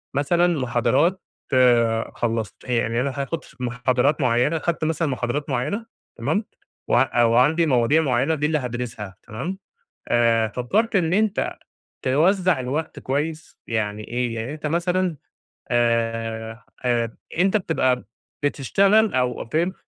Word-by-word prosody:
مثلًا 170 +3 +2
محاضرات 130 - +1 0.9
خلصت 115 -5 -2
هي 125 -1 0
يعني 115 +1 0
أنا 140 - 0
هاخد 160 +4 -4
ف - - -18
محاضرات 125 +4 +1
معيّنة، 125 +6 +2
خدت 165 +1 -2
مثلًا 160 +1 0
محاضرات 130 +2 -2
معيّنة، 210 +3 -2 0.3
تمام، 155 - -1 0.4
وع 120 -1 +3
وعندي 130 +9 +4
مواضيع 135 +2 +3
معيّنة 135 +2 +1
دي 150 -1 -1
اللي 155 +1 +2
هادرسها 120 -7 -5
تمام، 145 - -4 0.5
آآ 115 -2 +3
فكّرت 200 - 0
إن 170 -3 +1
أنت 210 0 +1 0.5
توزع 175 +4 +2
الوقت 145 +6 -3
كويّس؟ 155 +4 -3
يعني 110 -2 -2
إيه؟ 120 -1 -1
يعني 115 +5 -4
أنت 155 0 -6
مثلًا 175 +2 0 0.6
آآ، 115 -1 0 0.2
آآ 120 -2 0 0.2
أنت 195 +4 +3
بتبقى 130 -9 0 0.4
بتشتغل 195 - +3
أو 125 -1 0
فهم 165 +10 0
130 Hz, 125 wpm, -23 LUFS, 120-165 Hz, 0.9 s, وعندي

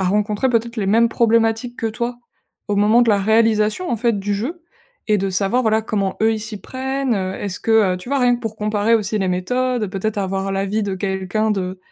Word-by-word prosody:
à - - 0
rencontrer 210 +5 +1
peut-être 235 0 -1
les 205 -3 -1
mêmes 230 +4 +4
problématiques 230 +1 +1
que 225 - -1
toi 235 +2 -3 0.5
au 205 - 0
moment 210 +4 +4
de 240 - +1
la 205 - +3
réalisation, 220 - +2
en 240 - +1
fait, 230 -2 0
du 205 +1 -2
jeu 270 - -4 0.5
et 210 -1 +3
de 195 0 -1
savoir, 195 +6 +1
voilà, 220 -1 +2
comment 200 -4 -2
eux 225 0 +4
ils 215 - -4
s'y 215 -1 -7
prennent, 265 -1 -2
heu, 190 -2 -2
est-ce 200 -2 -4
que, 220 -4 +3
heu, - - -4
tu 180 - -11
vois, 280 - +1
rien 245 -1 +4
que - - -12
pour 220 -2 -5
comparer 210 +1 +1
aussi 215 0 -2
les 190 - 0
méthodes, 245 +6 -1
peut-être 205 +2 -3
avoir 195 0 -2
l'avis 195 +2 -1
de 200 -2 -2
quelqu'un 190 +3 -1
de, 185 -2 -3
215 Hz, 225 wpm, -20 LUFS, 195-230 Hz, 0.5 s, mêmes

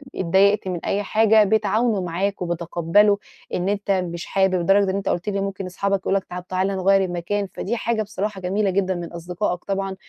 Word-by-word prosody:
اتضايقت 190 +3 +3
من 180 -2 -4
أي 205 +1 0
حاجة، 220 +1 +4
بيتعاونوا 220 +1 +1
معاك 185 +3 -2
وبيتقبَّلوا 175 +4 +2 0.4
إن 180 +2 0
أنتَ 205 0 -1
مش 175 -3 -2
حابب، 190 -1 +1
لدرجة 195 +2 +3
إن - - -3
أنتَ 200 -1 -2
قُلت 175 +4 -1
لي 200 -1 -1
ممكن 195 -1 -4
أصحابك 195 +2 -1
يقولوا 195 +1 +1
لك: 190 - -19
"طب 180 0 -6
تعالَ 185 +1 0
نغيِّر 195 0 +2
المكان." 185 +3 -2
فدي 235 +4 -3
حاجة 230 -1 -1
بصراحة 205 -1 -4
جميلة 195 +3 0
جدًا 190 0 0
من 175 -1 -6
أصدقائك 175 +2 -3
طبعًا، 195 -1 -2
195 Hz, 190 wpm, -22 LUFS, 180-200 Hz, 0.4 s, حاجة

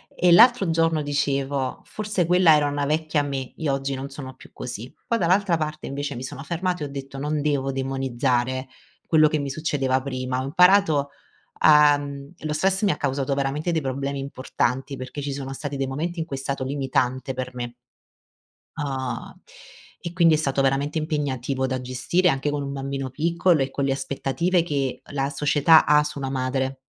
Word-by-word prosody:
e 180 -1 +3
l'altro 225 -1 +6
giorno 165 -1 +2
dicevo: 140 -2 -1
“Forse 210 -4 -2
quella 175 -2 +6
era 145 -1 +2
una 145 0 -1
vecchia 155 0 0
me 135 -3 -4
io 150 -4 0
oggi 135 0 -2
non 135 +1 -6
sono 130 -2 -8
più - - -16
così”, 120 0 -7
poi 230 - +1
dall'altra 185 0 +2
parte 155 -1 -4
invece 140 0 -4
mi 125 - -6
sono 140 +1 -7
fermata 175 0 -2
e - - -3
ho - - -11
detto: 135 0 -7
“Non 150 +1 -1
devo 140 -2 0
demonizzare 130 -1 -1 0.4
quello 155 -2 +5
che 150 0 0
mi 140 -1 -3
succedeva 135 -3 0
prima” 130 -1 -3
ho - - -3
imparato 170 -2 +4 0.5
a 150 -1 +7
mhmm, 140 +1 -7
lo 155 -1 -3
stress 190 +6 +1
mi 200 - +4
ha 150 - -2
causato 140 0 -1
veramente 140 +5 -1
dei 160 - +1
problemi 135 +1 -3
importanti 135 0 -2
perché 130 +3 -6
ci 140 -1 -3
sono 135 -1 -5
stati 145 +1 -5
dei 135 -1 -1
momenti 165 +6 -3
in 160 - -1
cui 140 -5 -5
è - - -5
stato 135 0 -3
limitante 130 -1 -1
per 130 0 -5
me. 120 -1 -5 1.0
Uhm, 130 -5 -4 0.6
e 170 - -3
quindi 170 -3 +5
è - - +4
stato 140 -3 0
veramente 140 +3 0
impegnativo 140 -4 -1
da 130 -1 -2
gestire 130 +9 0
anche 135 0 0
con 145 0 -2
un 140 0 -4
bambino 135 -1 -4
piccolo 170 +2 +2
e 135 - 0
con 140 - -1
le 135 - +1
aspettative 140 +6 0
che 140 -5 -2
la 140 -1 -1
società 150 +2 +4
ha 150 0 +5
su 150 -1 -6
una 135 -1 -3
madre 130 0 -1
140 Hz, 190 wpm, -24 LUFS, 135-155 Hz, 1.0 s, a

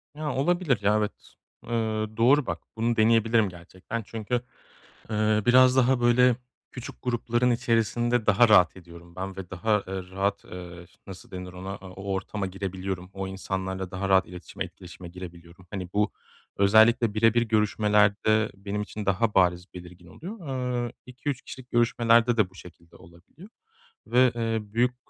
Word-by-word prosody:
Ya, 150 -2 -3
olabilir 155 - +1
ya. 105 +1 +3
Evet, 105 -1 0 0.6
ııı, 110 -2 -2
doğru 130 +5 +4
bak - - -4 0.2
bunu 115 +1 +1
deneyebilirim 115 -1 +3
gerçekten. 95 +6 -7
Çünkü, 115 +3 -3 0.7
ııı, 110 0 +1
biraz 130 +1 +6
daha, 130 0 +3
böyle, 120 0 +4 0.3
küçük 125 -1 -9
grupların 120 0 0
içerisinde 120 0 +1
daha 110 +3 +5
rahat 90 -5 +5
ediyorum 85 -1 -14
ben 95 +1 -5
ve 95 -3 -8
daha, 105 +4 +1
eee, 95 -1 -5
rahat, 100 +2 -1
eee, 90 -1 -10
ş - - -26
nasıl 95 -1 -11
denir 90 -1 -7
ona, 95 +2 -6
o 95 +1 -7
ortama 95 +1 -3
girebiliyorum, 95 -1 -5
o 95 0 -5
insanlarla 95 -1 -4
daha 95 +1 -3
rahat 95 -1 +4
iletişime, 90 0 -7
etkileşime 90 0 -11
girebiliyorum. 85 0 -11
Hani, 95 -3 -5
bu 105 0 +1 0.4
özellikle 110 +2 +4
birebir 115 +2 +3
görüşmelerde 105 -1 +2
benim 100 +1 -4
için 105 0 -7
daha 100 +3 +1
bariz, 90 -1 +3
belirgin 90 0 -12
oluyor. 175 - -9 0.4
Eee, - - -8
2-3 125 +2 -5
kişilik 130 -1 -11
görüşmelerde 120 0 +3
de 105 -4 +2
bu - - -24
şekilde 85 -2 -15
olabiliyor 85 - -16 0.6
ve, 125 0 +4
eee, 115 -1 -1
büyük, 125 +2 +2
105 Hz, 150 wpm, -26 LUFS, 95-120 Hz, 0.7 s, biraz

